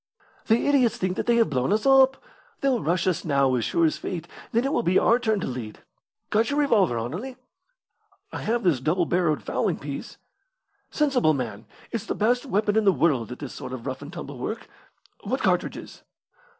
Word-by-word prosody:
"The 225 Hz, +1 st, +3 dB
idiots 270 Hz, -5 st, +3 dB
think 185 Hz, 0 st, -1 dB
that -, -, -2 dB
they 240 Hz, -, +4 dB
have 230 Hz, -8 st, +3 dB
blown 130 Hz, +4 st, 0 dB
us 215 Hz, +3 st, +1 dB
up. 270 Hz, 0 st, +6 dB, 0.4 s
They'll 265 Hz, -5 st, +1 dB
rush 170 Hz, +2 st, 0 dB
us 185 Hz, -3 st, 0 dB
now, 140 Hz, -4 st, +2 dB
as 120 Hz, -2 st, 0 dB
sure 165 Hz, +10 st, +2 dB
as 155 Hz, -, 0 dB
fate; 170 Hz, -2 st, -5 dB, 0.2 s
then 235 Hz, +3 st, +1 dB
it 275 Hz, -, 0 dB
will -, -, +2 dB
be 185 Hz, -4 st, +2 dB
our 235 Hz, +2 st, +4 dB
turn 220 Hz, -4 st, 0 dB
to -, -, -2 dB
lead. 120 Hz, -4 st, -6 dB, 0.5 s
Got 220 Hz, +2 st, +2 dB
your 285 Hz, -, -1 dB
revolver, 210 Hz, -, +3 dB
Anerley?" 180 Hz, -, -5 dB, 1.0 s
"I -, -, -4 dB
have 235 Hz, +2 st, -1 dB
this 165 Hz, -8 st, +2 dB
double 165 Hz, +7 st, +1 dB
barrelled 170 Hz, -3 st, 0 dB
fowling -, -, -1 dB
piece." -, -, -7 dB, 0.7 s
"Sensible 260 Hz, -, +2 dB
man! 115 Hz, -5 st, -5 dB, 0.2 s
It's 225 Hz, -2 st, -4 dB
the -, -, -2 dB
best 245 Hz, +5 st, +1 dB
weapon 210 Hz, -2 st, +1 dB
in 220 Hz, -, +3 dB
the 195 Hz, -, +6 dB
world 140 Hz, -, +1 dB
at 125 Hz, -, -6 dB
this 145 Hz, -4 st, -7 dB
sort 125 Hz, -, -7 dB
of 125 Hz, -3 st, -7 dB
rough 130 Hz, 0 st, -4 dB
and 145 Hz, +2 st, -9 dB
tumble 145 Hz, -7 st, -8 dB
work. 220 Hz, -, -5 dB, 0.6 s
What -, -, -2 dB
cartridges?" -, -, -1 dB
185 Hz, 200 wpm, -25 LUFS, 140-235 Hz, 1.0 s, up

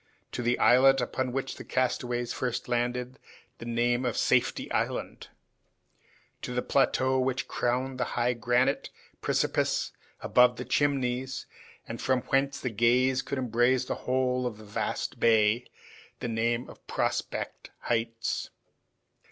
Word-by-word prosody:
To -, -, -3 dB
the 120 Hz, +1 st, +1 dB
islet 135 Hz, +2 st, +6 dB
upon 130 Hz, -1 st, -2 dB
which 135 Hz, +1 st, -3 dB
the -, -, -8 dB
castaways 120 Hz, -1 st, -1 dB
had -, -, -6 dB
first 125 Hz, -2 st, -2 dB
landed, 125 Hz, +1 st, -1 dB, 0.4 s
the 115 Hz, -, -7 dB
name 120 Hz, +1 st, +1 dB
of 120 Hz, -3 st, -1 dB
Safety -, -, +2 dB
Island; -, -, -2 dB, 1.1 s
to 125 Hz, -, -5 dB
the 125 Hz, -, 0 dB
plateau 130 Hz, -1 st, +2 dB
which 130 Hz, +1 st, -1 dB
crowned 130 Hz, +2 st, -1 dB
the -, -, +2 dB
high 120 Hz, +1 st, +2 dB
granite 120 Hz, +1 st, +1 dB, 0.3 s
precipice -, -, 0 dB, 0.3 s
above 125 Hz, 0 st, +4 dB
the 125 Hz, -, -6 dB
Chimneys, 130 Hz, -2 st, 0 dB, 0.4 s
and 115 Hz, -, -6 dB
from 130 Hz, -1 st, +1 dB
whence 135 Hz, +1 st, +1 dB
the 125 Hz, -, -3 dB
gaze 125 Hz, +4 st, +3 dB
could 140 Hz, -, -4 dB
embrace 125 Hz, +1 st, +2 dB
the -, -, -2 dB
whole 125 Hz, 0 st, 0 dB
of 110 Hz, -4 st, -6 dB
the 110 Hz, -, -12 dB
vast 105 Hz, -, -3 dB
bay, 115 Hz, +1 st, +3 dB, 0.5 s
the -, -, -3 dB
name 115 Hz, +1 st, 0 dB
of -, -, -15 dB
Prospect -, -, -2 dB
Heights. 115 Hz, -1 st, -2 dB
125 Hz, 140 wpm, -28 LUFS, 120-130 Hz, 1.1 s, islet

